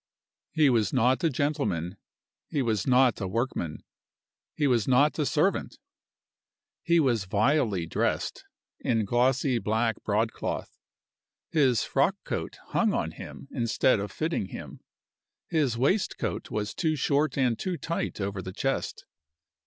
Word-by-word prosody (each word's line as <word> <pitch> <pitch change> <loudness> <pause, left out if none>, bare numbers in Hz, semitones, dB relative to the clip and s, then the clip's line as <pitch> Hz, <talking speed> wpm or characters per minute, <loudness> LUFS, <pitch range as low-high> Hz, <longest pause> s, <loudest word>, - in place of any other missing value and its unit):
He 155 -2 +4
was 110 -5 +2
not 130 +2 +2
a 165 - +4
gentleman; 105 - -1 0.5
he 140 - -1
was 110 -5 0
not 125 -3 +4
a 95 - -1
workman; 95 - -2 0.7
he 150 - +1
was 120 -6 +2
not 140 +5 +3
a 150 - +1
servant. 165 +6 0 1.0
He 170 -1 +3
was 120 -9 +2
vilely 105 - +1
dressed, 80 - -1 0.4
in 115 -3 +1
glossy 125 +3 +2
black 110 +1 0
broadcloth. 110 +2 -2 0.8
His 135 -8 +3
frockcoat - - -1
hung - - +2
on - - -1
him - - -10
instead 115 0 +2
of 100 +1 -4
fitting 160 - -2
him. - - -9 0.7
His 145 -8 +1
waistcoat 185 - 0
was 105 0 -3
too 160 -3 0
short 145 0 +1
and 125 -4 +1
too 185 -2 -2
tight 165 -8 -3
over 100 -1 -3
the 95 0 -7
chest. 135 +6 -2
125 Hz, 130 wpm, -27 LUFS, 105-145 Hz, 1.0 s, He